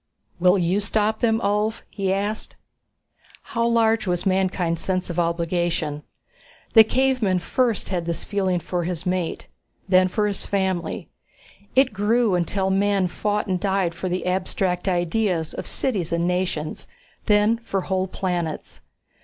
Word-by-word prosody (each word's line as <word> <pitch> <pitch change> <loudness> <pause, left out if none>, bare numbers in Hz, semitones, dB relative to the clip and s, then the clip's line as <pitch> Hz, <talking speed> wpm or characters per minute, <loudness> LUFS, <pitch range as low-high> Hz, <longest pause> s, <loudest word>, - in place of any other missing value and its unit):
"Will 180 +2 +5
you 180 +2 +1
stop 215 +1 0
them, 225 -1 +2
Ulv?" 210 +1 0
he 195 -2 -2
asked. 205 +3 -2 1.0
How 230 0 +2
large 225 -2 +2
was 175 -1 -1
mankind's 185 -3 +1
sense 185 -1 -1
of 170 - -2
obligation? 170 -3 -1 0.7
The 225 - +10
caveman 250 -5 +1
first 230 +5 0
had 175 -3 -2
this 170 -1 -3
feeling 190 -3 0
for 175 +1 -2
his 175 0 -4
mate, 180 -2 -2 0.4
then 185 -1 +5
for 210 +3 0
his 205 -2 -2
family. 190 -3 -2 0.7
It 260 -3 +4
grew 215 +2 +2
until 190 +2 0
men 195 -1 +2
fought 210 +3 -1
and 185 -3 -1
died 190 -3 0
for 180 +2 -4
the 180 +1 -2
abstract 180 0 -1
ideas 175 -1 0
of - - -5
cities 200 -11 -1
and 170 +1 +1
nations, 180 -4 -2 0.4
then 210 +2 +4
for 200 -4 -2
whole 185 0 -1
planets. 175 -4 -3
190 Hz, 145 wpm, -23 LUFS, 175-210 Hz, 1.0 s, The